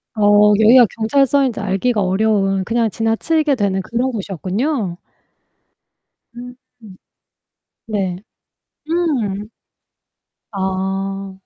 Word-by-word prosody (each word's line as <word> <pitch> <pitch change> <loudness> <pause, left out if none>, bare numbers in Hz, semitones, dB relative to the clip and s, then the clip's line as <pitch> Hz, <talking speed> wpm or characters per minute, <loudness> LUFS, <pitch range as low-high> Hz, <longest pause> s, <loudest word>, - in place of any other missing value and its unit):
어 210 0 +5
여기가 235 +2 +6
경찰서인지 270 +2 +1
알기가 210 +3 0
어려운 195 0 +1
그냥 230 +2 0
지나치게 280 +8 0
되는 200 -4 -1
그런 240 +6 -2
곳이었군요. 200 - -3 1.4
음. 245 +1 -9 1.3
네. 195 -5 -2 0.7
음. 240 - -1 1.0
아. 195 0 -3
215 Hz, 180 characters per minute, -18 LUFS, 195-245 Hz, 1.4 s, 여기가